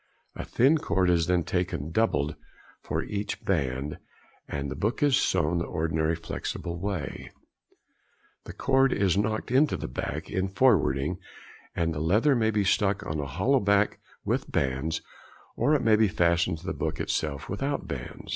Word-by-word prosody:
A - - -5
thin 140 +6 +3
cord 95 - +1
is 85 -2 +2
then 90 -1 +2
taken 85 -4 -2
doubled 80 -8 +1 0.5
for - - -2
each 105 0 -4
band, 70 -5 -1 0.5
and 70 -1 -4
the - - -4
book 115 +8 -1
is 145 -3 +4
sewn 85 -5 +1
the 85 - -2
ordinary 80 0 0
flexible 85 +1 -5
way; 95 -8 -4 1.2
the - - -8
cord 135 0 +3
is 100 -3 +2
knocked 110 +3 -1
into 140 +4 +3
the - - -5
back - - -4
in 95 +1 -1
forwarding, 90 - +2 0.6
and 85 -1 0
the 75 - -4
leather 105 - +3
may 110 -2 +2
be 105 -2 +1
stuck 100 0 +1
on 75 0 -3
a 70 - -3
hollow 95 - +2
back 100 -1 +2 0.3
with - - -1
bands, 65 +4 -1 0.5
or 150 - +3
it 135 - 0
may 110 -1 +5
be 110 0 +4
fastened 85 -2 +1
to - - -14
the - - -2
back - - -3
itself 70 -3 -2
without 135 +8 -2
bands. 65 -3 -7
90 Hz, 165 wpm, -27 LUFS, 80-110 Hz, 1.2 s, may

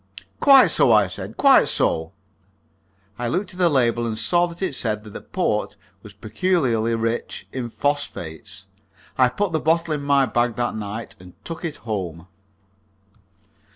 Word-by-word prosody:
"Quite 270 - +7
so," 125 - +4
I 105 -2 +5
said 90 - -8
"quite - - +5
so." 80 +3 0 1.1
I 120 - -2
looked 185 - -2
at 180 - -12
the 175 -2 +4
label, 120 -4 +1
and 110 -1 -3
saw 175 +9 +2
that 170 +2 -8
it 185 - -1
said 110 -4 -3
that 105 - -11
the - - -8
port 105 - -2 0.3
was 105 - -12
peculiarly 115 - 0
rich 115 +1 -3
in 125 -2 -4
phosphates. 115 - -4 0.5
I 125 -1 +4
put 200 +9 -2
the 160 - 0
bottle 165 +1 +1
in 150 - -3
my 140 -1 +3
bag 120 -2 0
that 120 +1 -1
night 110 +1 -6
and 90 -1 -15
took 165 - -7
it 160 -4 -3
home. 90 -7 -4
120 Hz, 160 wpm, -22 LUFS, 110-165 Hz, 1.1 s, Quite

